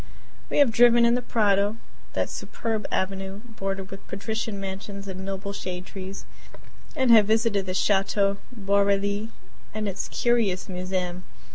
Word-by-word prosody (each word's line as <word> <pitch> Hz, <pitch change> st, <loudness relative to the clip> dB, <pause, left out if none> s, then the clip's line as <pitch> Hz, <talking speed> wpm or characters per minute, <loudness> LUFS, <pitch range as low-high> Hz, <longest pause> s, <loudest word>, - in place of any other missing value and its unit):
We -, -, -1 dB
have 285 Hz, -5 st, +6 dB
driven 235 Hz, +1 st, +6 dB
in 235 Hz, -, +4 dB
the 245 Hz, -, +1 dB
Prado 205 Hz, -2 st, +2 dB, 0.4 s
that -, -, 0 dB
superb 225 Hz, -2 st, -3 dB
avenue 195 Hz, +1 st, -2 dB
bordered 195 Hz, -4 st, -4 dB
with 195 Hz, -, -10 dB
patrician 220 Hz, +1 st, -3 dB
mansions 195 Hz, +1 st, -6 dB
and 190 Hz, 0 st, -6 dB
noble 195 Hz, +1 st, -4 dB
shade 185 Hz, -2 st, -5 dB
trees 190 Hz, 0 st, -7 dB, 0.7 s
and 260 Hz, -4 st, +3 dB
have 215 Hz, -3 st, +8 dB
visited 220 Hz, -3 st, +2 dB
the 185 Hz, -, -2 dB
chateau 195 Hz, 0 st, +2 dB
Boarely 200 Hz, 0 st, +1 dB, 0.5 s
and 215 Hz, -1 st, -1 dB
its 195 Hz, -, -3 dB
curious 225 Hz, -7 st, +1 dB
museum. 185 Hz, -1 st, -3 dB
200 Hz, 140 wpm, -26 LUFS, 195-220 Hz, 0.7 s, have